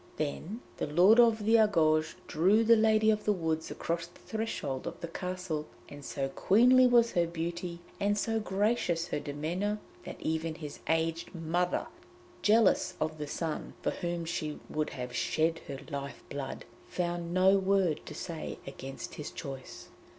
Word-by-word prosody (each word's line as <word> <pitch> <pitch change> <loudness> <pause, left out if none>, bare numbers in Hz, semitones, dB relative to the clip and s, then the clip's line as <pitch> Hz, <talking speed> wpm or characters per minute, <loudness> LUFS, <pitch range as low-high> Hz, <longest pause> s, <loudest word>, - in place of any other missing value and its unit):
Then 160 +9 -3 0.2
the - - -2
Lord 180 +10 +6
of 225 -3 +5
the 225 +1 +6
Argouges 160 -7 +3
drew 195 +8 +3
the 230 +1 +7
Lady 220 0 +4
of 210 -1 -1
the 210 - +4
Woods 160 -4 -1
across 170 0 -3
the 175 - -20
threshold 215 -12 -3
of - - -6
the 170 - -5
castle, 180 -3 -4 0.2
and 145 0 -10
so 135 -1 -2
queenly 250 - +5
was 235 -1 +5
her 170 -1 +2
beauty 170 +1 -4 0.2
and 205 +1 +1
so 225 +1 0
gracious 195 -5 0
her - - -1
demeanour, 165 +9 -2 0.3
that - - -7
even 160 0 -2
his 150 -3 -8
aged 165 +2 0
mother, 175 +2 0 0.6
jealous 210 -4 +4
of 155 0 -2
the 150 - -4
son 160 +1 -4
for - - +1
whom 175 -2 -3
she 155 -2 -3
would 155 0 -1
have 125 -1 -6
shed 165 +4 +1
her 140 - -5
life 140 0 -5
blood, 140 -1 -5 0.2
found 175 -1 -2
no 190 +2 +5
word 190 -4 +2
to - - -7
say 165 -3 -5
against 135 0 -7
his 150 0 -6
choice. 135 -3 -8
170 Hz, 165 wpm, -31 LUFS, 155-205 Hz, 0.6 s, the